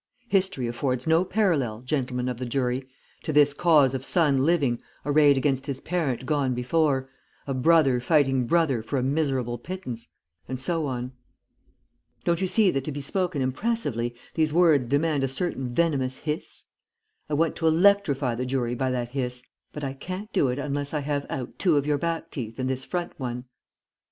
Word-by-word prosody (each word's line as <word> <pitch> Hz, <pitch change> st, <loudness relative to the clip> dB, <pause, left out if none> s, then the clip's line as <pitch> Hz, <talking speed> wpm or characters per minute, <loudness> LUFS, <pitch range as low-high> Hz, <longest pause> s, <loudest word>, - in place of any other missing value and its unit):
History 190 Hz, -, +1 dB
affords 125 Hz, +2 st, -2 dB
no 165 Hz, +2 st, +4 dB
parallel, 165 Hz, -, 0 dB
gentlemen 125 Hz, -2 st, -2 dB
of 125 Hz, -2 st, -2 dB
the 125 Hz, -, -4 dB
jury, 125 Hz, +1 st, -1 dB, 0.3 s
to -, -, -3 dB
this 145 Hz, -1 st, +5 dB
cause 150 Hz, -5 st, +4 dB
of 130 Hz, -1 st, -3 dB
son 145 Hz, -4 st, +3 dB
living 140 Hz, -8 st, +2 dB, 0.2 s
arrayed 145 Hz, -1 st, +5 dB
against 135 Hz, 0 st, 0 dB
his 135 Hz, -2 st, -3 dB
parent 145 Hz, -8 st, -2 dB
gone 135 Hz, -2 st, 0 dB
before, 135 Hz, +1 st, +1 dB, 0.4 s
of 135 Hz, -2 st, -2 dB
brother 150 Hz, -5 st, +4 dB
fighting 135 Hz, -2 st, +2 dB
brother 160 Hz, -8 st, +2 dB
for 115 Hz, +5 st, -3 dB
a 125 Hz, -, 0 dB
miserable 135 Hz, -4 st, 0 dB
pittance_, 130 Hz, -8 st, -6 dB, 0.4 s
and 130 Hz, -1 st, -4 dB
so 160 Hz, +2 st, 0 dB
on. 125 Hz, -1 st, -4 dB, 1.1 s
Don't 170 Hz, +1 st, +1 dB
you 190 Hz, -, +1 dB
see 205 Hz, -1 st, +4 dB
that 135 Hz, -3 st, -1 dB
to 155 Hz, -, -3 dB
be 145 Hz, -, -5 dB
spoken 170 Hz, 0 st, -1 dB
impressively 130 Hz, -, -1 dB, 0.2 s
these 155 Hz, -2 st, +1 dB
words 155 Hz, -6 st, +4 dB
demand 145 Hz, +1 st, +1 dB
a -, -, +2 dB
certain 135 Hz, -2 st, -2 dB
venomous 130 Hz, -2 st, 0 dB
hiss? 150 Hz, 0 st, -5 dB, 0.6 s
I 150 Hz, -, 0 dB
want 160 Hz, +2 st, +1 dB
to 165 Hz, -, +1 dB
electrify 160 Hz, -7 st, +3 dB
the 120 Hz, +2 st, -3 dB
jury 125 Hz, -2 st, -1 dB
by 130 Hz, +1 st, -1 dB
that 125 Hz, -2 st, -2 dB
hiss, 125 Hz, -1 st, -3 dB, 0.3 s
but 150 Hz, -, -7 dB
I 135 Hz, -1 st, -2 dB
can't 185 Hz, +9 st, -7 dB
do 140 Hz, -, +3 dB
it 125 Hz, +1 st, -1 dB
unless 145 Hz, +1 st, -3 dB
I 150 Hz, -, 0 dB
have 145 Hz, 0 st, -2 dB
out 130 Hz, -2 st, -5 dB
two 170 Hz, -6 st, +3 dB
of 140 Hz, -, +1 dB
your 145 Hz, -1 st, +1 dB
back 165 Hz, 0 st, -3 dB
teeth 115 Hz, -5 st, -6 dB
and 130 Hz, -1 st, -2 dB
this 130 Hz, 0 st, -1 dB
front 175 Hz, +2 st, -3 dB
one.' 125 Hz, -1 st, -4 dB
140 Hz, 180 wpm, -26 LUFS, 125-160 Hz, 1.1 s, this